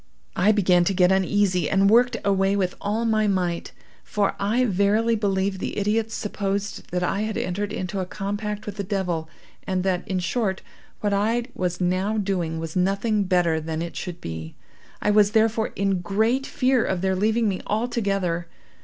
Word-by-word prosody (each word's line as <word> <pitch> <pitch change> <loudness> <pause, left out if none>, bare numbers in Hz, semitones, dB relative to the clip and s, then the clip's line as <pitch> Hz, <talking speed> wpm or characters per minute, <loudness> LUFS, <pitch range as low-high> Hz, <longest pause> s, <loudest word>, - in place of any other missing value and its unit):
I 205 +3 +4
began 180 -4 +4
to 195 - +1
get 180 0 +4
uneasy, 190 -3 +2
and 195 0 +3
worked 240 +3 +4
away 195 0 +2
with 185 -2 0
all 215 +3 -1
my 215 -1 +2
might, 180 -3 -1 0.3
for 205 -2 0
I 225 +6 +2
verily 210 +3 +2
believe 195 -2 0
the - - -4
idiots 220 +2 0
supposed 200 -1 -3
that 180 0 -1
I 195 +3 0
had 215 0 -2
entered 200 +3 -2
into 185 +1 -3
a 185 - -3
compact 205 +2 -4
with 210 -1 -6
the 200 - -2
devil, 180 -5 -2 0.4
and 185 -1 0
that, 185 -2 +1
in 190 - -1
short, 190 +2 -1 0.4
what 205 -1 0
I 225 +4 +1
was 180 -1 -2
now 185 +4 0
doing 185 -5 -1
was 160 0 -5
nothing 200 +3 +1
better 175 -3 +2
than 160 +1 -3
it 170 - -7
should 175 -2 -5
be. 80 - -7 0.5
I 210 - +3
was, 210 0 +4
therefore, 220 0 +3
in 195 -2 0
great 220 +9 +1
fear 255 -2 +2
of 185 -2 -1
their 190 0 +1
leaving 220 +4 +2
me 190 -2 -1
altogether. 195 -6 -1
195 Hz, 180 wpm, -24 LUFS, 180-215 Hz, 0.5 s, I